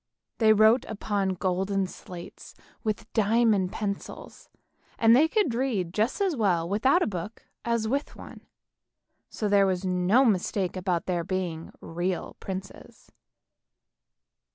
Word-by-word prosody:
They 220 -2 +5
wrote 220 +3 +5
upon 200 -3 -2
golden 190 +2 0
slates 180 -1 -11 0.3
with 220 0 -4
diamond 215 -3 +2
pencils, 200 -2 -6 0.5
and 225 0 +5 0.2
could 410 - +1
read 225 -9 -1
just 220 - 0
as 380 -5 +1
well 180 -8 +1
without 260 - +3
a - - +1
book 200 +2 -6 0.2
as 235 -2 0
with 280 +5 -2
one, - - -12 0.8
so 215 - -3
there 200 -1 +4
was 185 0 -1
no 185 +8 +3
mistake 195 -3 0
about 180 -2 -1
their 175 -2 -1
being 175 -3 -4
real 175 +2 -3
princes. 190 0 -8
200 Hz, 125 wpm, -27 LUFS, 185-225 Hz, 0.8 s, They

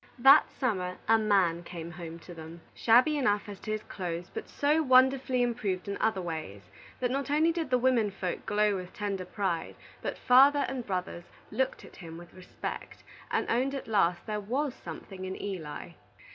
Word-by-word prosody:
That 270 +3 +7
summer, 185 -8 -2
a 225 0 +5
man 190 -6 +2
came 170 -1 -8
home 165 -1 -8
to 175 - -9
them, 165 0 -10
shabby 250 +7 +4
enough 205 -6 +1
as 205 -2 -8
to 215 - -5
his 215 0 -2
clothes, 175 -2 -5
but - - -6
so 300 +3 +2
wonderfully 260 -2 +4
improved 210 -7 -2
in 200 - -2
other 215 -4 +1
ways, 155 - -5 0.4
that 250 -1 0
not 275 +2 -2
only 310 +3 +3
did 330 -4 -3
the 250 - +3
women 245 -4 +2
folk 185 -2 -4
glow 210 0 +2
with 180 -1 -8
tender 200 -3 -3
pride, 185 -3 -2 0.3
but - - -4
father 275 +3 +6
and 255 -3 -5
brothers 180 -2 -3 0.3
looked 265 0 -1
at - - -15
him 165 -3 -9
with 175 0 -13
respect, 185 -1 -7 0.3
and - - 0
owned 260 +4 +1
at 270 - -6
last 180 -5 +1
there 210 -1 -2
was 260 +6 -1
something 190 -6 -9
in 185 0 -5
Eli. 180 -7 -6
205 Hz, 185 wpm, -29 LUFS, 180-255 Hz, 0.4 s, That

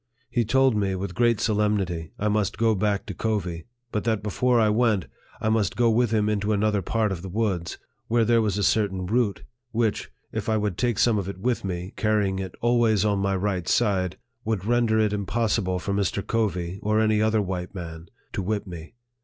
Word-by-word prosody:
He 120 - +2
told 130 +2 +3
me, 100 -2 0
with 95 -1 -4
great 120 +1 +2
solemnity, 100 -7 0
I 105 - -1
must 105 -2 0
go 115 0 +3
back 105 0 0
to 100 - -6
Covey; 90 -5 -2 0.2
but 105 - -1
that 110 -3 0
before 120 +4 +2
I 110 - +4
went, 105 -3 +2 0.3
I 110 - 0
must 110 -2 +1
go 120 -1 +3
with 120 +1 +2
him 105 -1 +1
into 105 0 0
another 105 0 +1
part 110 +3 0
of 90 -3 -4
the 95 - -7
woods, 95 -4 -1 0.3
where 115 0 +2
there 115 0 +4
was 105 -3 0
a 100 - 0
certain 95 -2 +1
root, 110 0 0 0.3
which, 115 -2 -1 0.2
if - - -3
I 110 - +2
would 105 -3 -1
take 120 0 0
some 115 -2 +3
of 95 -1 -4
it 100 - -6
with 120 +5 -1
me, 90 +1 -4
carrying 105 -3 +1
it 95 -1 -5
always 115 -4 +3
on 100 -2 +1
my 100 0 +1
right 95 -2 -1
side, 95 -5 +1 0.3
would 110 -5 -2
render 120 -1 +2
it 105 -1 +2
impossible 100 -2 0
for 100 +2 -3
Mr. 100 0 -1
Covey, 95 -5 -1
or 110 +1 +1
any 110 -1 +3
other 110 0 +2
white 90 0 -4
man, 85 -2 -7 0.3
to 105 - -2
whip 105 +2 -2
me. 85 -1 -9
105 Hz, 205 wpm, -25 LUFS, 95-110 Hz, 0.3 s, I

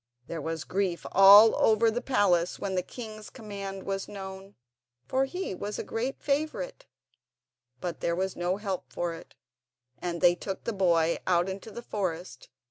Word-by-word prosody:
There 165 +3 -5
was 160 +1 -3
grief 185 -3 -2
all 200 +3 +9
over 225 +1 +4
the 240 +2 -2
palace 185 -9 +2
when 195 -1 -3
the 185 - +1
king's 215 +1 -9
command 200 -4 -7
was 195 0 -3
known, 195 0 -9 0.5
for 265 - +1
he 360 - -4
was 205 +3 -5
a - - -3
great 245 +4 -3
favourite. 285 - -2 0.9
But 175 +2 -4
there 170 - 0
was 190 +1 -2
no 175 +2 -1
help 195 -3 -4
for 175 -1 -2
it, 165 - -12 0.6
and 170 -1 -3
they 175 0 +6
took 190 +2 -6
the 230 - -2
boy 170 -4 +2
out 175 0 +3
into 190 +3 -6
the 235 +3 -8
forest. 185 -5 -4
195 Hz, 165 wpm, -28 LUFS, 175-215 Hz, 0.9 s, all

